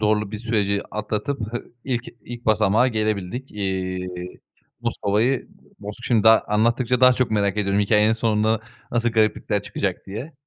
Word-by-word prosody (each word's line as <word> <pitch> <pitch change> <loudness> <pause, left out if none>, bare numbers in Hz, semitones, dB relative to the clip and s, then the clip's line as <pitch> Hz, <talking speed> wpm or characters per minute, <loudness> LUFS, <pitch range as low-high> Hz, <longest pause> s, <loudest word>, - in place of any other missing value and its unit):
zorlu 105 -1 +1
bir 105 - -5
süreci 105 -3 0
atlatıp 110 +6 -3 0.4
ilk 125 -3 -1 0.2
ilk 120 -1 -9
basamağa 110 +3 +3
gelebildik. 110 +2 -2
Eee, 95 -2 -2 0.7
Moskova'yı 115 +6 0 0.3
Mos 105 +1 -7
şimdi 115 -4 +2
daha 110 0 +8
anlattıkça 115 +4 +2
daha 130 0 +8
çok 125 -1 0
merak 100 -1 +1
ediyorum 100 0 +1
hikâyenin 105 +1 +3
sonunda 110 -1 +1 0.3
nasıl 120 0 +1
gariplikler 110 -2 +1
çıkacak - - -3
diye. 115 +11 -6
110 Hz, 140 wpm, -23 LUFS, 105-120 Hz, 0.7 s, daha